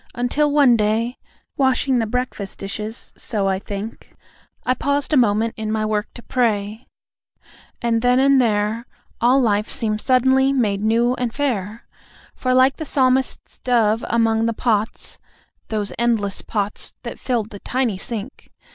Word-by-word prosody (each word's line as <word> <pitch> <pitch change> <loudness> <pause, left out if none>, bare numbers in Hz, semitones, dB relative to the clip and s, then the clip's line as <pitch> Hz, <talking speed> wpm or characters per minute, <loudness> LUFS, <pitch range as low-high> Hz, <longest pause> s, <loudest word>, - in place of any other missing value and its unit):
Until 280 +5 +1
one 280 -4 +5
day, 225 +3 0 0.4
Washing 265 -1 +2
the 225 - 0
breakfast 230 -4 -3
dishes, 210 +3 -6
so 205 -4 -2
I 190 -1 0
think, 205 +2 -7 0.5
I 255 - +3
paused 285 +3 -1
a - - +5
moment 225 -2 +3
in 215 -1 -3
my 215 0 0
work 215 -1 -1
to 240 - -10
pray; 220 -2 -1 1.0
And 230 -1 +1
then 250 +1 +3
and 270 0 +5
there 220 +1 0 0.3
All 250 +3 +5
life 210 -4 +1
seemed 215 -1 -1
suddenly 265 +1 +3
made 210 -7 +1
new 230 +3 +2
and 245 -2 -1
fair; 225 -6 -2 0.5
For, 255 - -2
like 260 +1 +4
the 315 - -4
Psalmist's 260 -2 0
dove 225 -3 +2
among 225 -1 +2
the 230 - 0
pots 220 -1 -1 0.5
(Those 210 -2 -2
endless 225 -5 0
pots, 205 -1 -4
that - - -7
filled 230 -4 -2
the 205 - -9
tiny 240 -6 -1
sink!) 230 +4 -6
230 Hz, 150 wpm, -21 LUFS, 215-255 Hz, 1.0 s, one